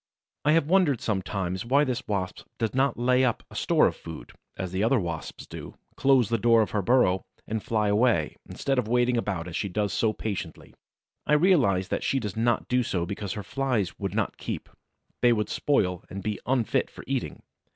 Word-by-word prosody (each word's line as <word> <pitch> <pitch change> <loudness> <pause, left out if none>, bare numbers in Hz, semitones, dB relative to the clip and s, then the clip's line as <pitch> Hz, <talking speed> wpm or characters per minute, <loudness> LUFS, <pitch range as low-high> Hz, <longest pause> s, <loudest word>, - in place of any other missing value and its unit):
I 150 - +5
have 165 -3 +3
wondered 165 - +3
sometimes 95 -2 -2
why 135 +5 +3
this 125 -4 -2
Wasp 95 -3 -3
does 115 -2 -1
not 135 +2 +1
lay 125 +2 +3
up 120 -3 0
a - - -12
store - - +3
of - - +1
food, 80 -1 -9 0.3
as 95 -2 -4
the 95 +2 0
other 120 +3 +3
Wasps 85 -4 -5
do, - - -9 0.2
close 135 -5 +4
the 115 -1 +1
door 115 0 +5
of - - -5
her 105 - 0
burrow 95 -5 +3 0.2
and 110 0 -3
fly 105 -1 0
away, 105 -6 +2
instead 135 -2 -1
of 115 - -1
waiting 120 +1 +2
about, 95 -7 -2
as 85 - -6
she 100 - -1
does 100 0 -1
so 110 - +2
patiently. 105 -2 -5 0.5
I - - +3
realize 145 - +3
that - - -1
she 135 - +1
does 105 -6 -4
not 115 +1 +1
do 125 0 +2
so 90 -7 -1
because 100 +1 -4
her 105 - -5
Flies 125 -5 -1
would 100 -1 -3
not 110 -2 -1
keep; - - -5 0.5
they 120 -1 +5
would 105 -2 -1
spoil 90 - +1
and 95 0 -6
be 105 -1 -2
unfit 125 -3 +1
for - - -11
eating. - - -3
110 Hz, 205 wpm, -27 LUFS, 95-125 Hz, 0.5 s, I